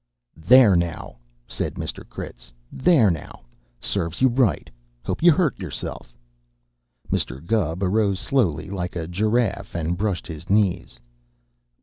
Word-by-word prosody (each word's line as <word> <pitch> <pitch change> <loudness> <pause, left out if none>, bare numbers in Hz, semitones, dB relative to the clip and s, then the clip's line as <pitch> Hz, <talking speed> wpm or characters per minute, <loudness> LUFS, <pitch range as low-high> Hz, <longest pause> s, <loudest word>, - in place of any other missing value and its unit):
"There, 105 +5 +6
now!" 85 -2 -2 0.3
said - - -4
Mr. - - -5
Critz. - - -9 0.2
"There, 130 - +4
now! 85 - -7 0.4
Serves 85 -5 -2
you 130 - +5
right. 120 -5 +1 0.4
Hope - - -3
you 170 +1 +7
hurt 155 - +1
chuself!" 85 -8 -6 1.0
Mr. 65 - -1
Gubb 95 -4 0
arose 100 0 +1
slowly, 95 - 0
like 90 -2 -4
a 85 -2 -3
giraffe, 105 +1 -1
and 85 +1 -1
brushed 100 -1 -2
his 80 +2 -9
knees. 100 -3 +1
100 Hz, 125 wpm, -23 LUFS, 85-115 Hz, 1.0 s, you